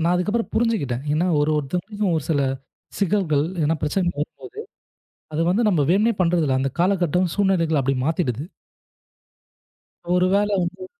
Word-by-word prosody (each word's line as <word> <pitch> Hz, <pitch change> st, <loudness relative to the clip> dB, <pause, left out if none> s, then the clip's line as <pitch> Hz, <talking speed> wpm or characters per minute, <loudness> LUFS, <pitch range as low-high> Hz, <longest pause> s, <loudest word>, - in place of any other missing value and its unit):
நான் 175 Hz, -, +3 dB
அதுக்கப்புறம் 210 Hz, +6 st, -1 dB
புரிஞ்சுக்கிட்டேன். 200 Hz, -, 0 dB
ஏன்னா, 165 Hz, +4 st, +1 dB
ஒரு 150 Hz, -, +1 dB
ஒருத்தருக்கு 180 Hz, +9 st, -3 dB
ஒரு 155 Hz, -, -3 dB
சில 145 Hz, -3 st, +2 dB, 0.6 s
சிக்கல்கள், 185 Hz, -7 st, +1 dB, 0.2 s
ஏதாவது 155 Hz, +1 st, 0 dB
பிரச்சனை 175 Hz, +4 st, 0 dB
வரும்போது, 405 Hz, -, -6 dB, 0.7 s
அத 155 Hz, -, -2 dB
வந்து 210 Hz, +6 st, +2 dB
நம்ம 160 Hz, -7 st, +2 dB
வேணும்னே 215 Hz, +5 st, +3 dB
பண்றதுல 165 Hz, -6 st, +2 dB
அந்தக் 135 Hz, +3 st, -3 dB
காலகட்டம் 180 Hz, -2 st, +1 dB
சூழ்நிலைகள் 175 Hz, -7 st, +2 dB
அப்படி 135 Hz, +1 st, 0 dB
மாத்திடுது. 150 Hz, -5 st, -1 dB, 1.7 s
ஒரு 180 Hz, 0 st, +3 dB
வேல 205 Hz, +1 st, +2 dB
வந்து 185 Hz, -, -5 dB
175 Hz, 135 wpm, -22 LUFS, 150-200 Hz, 1.7 s, நான்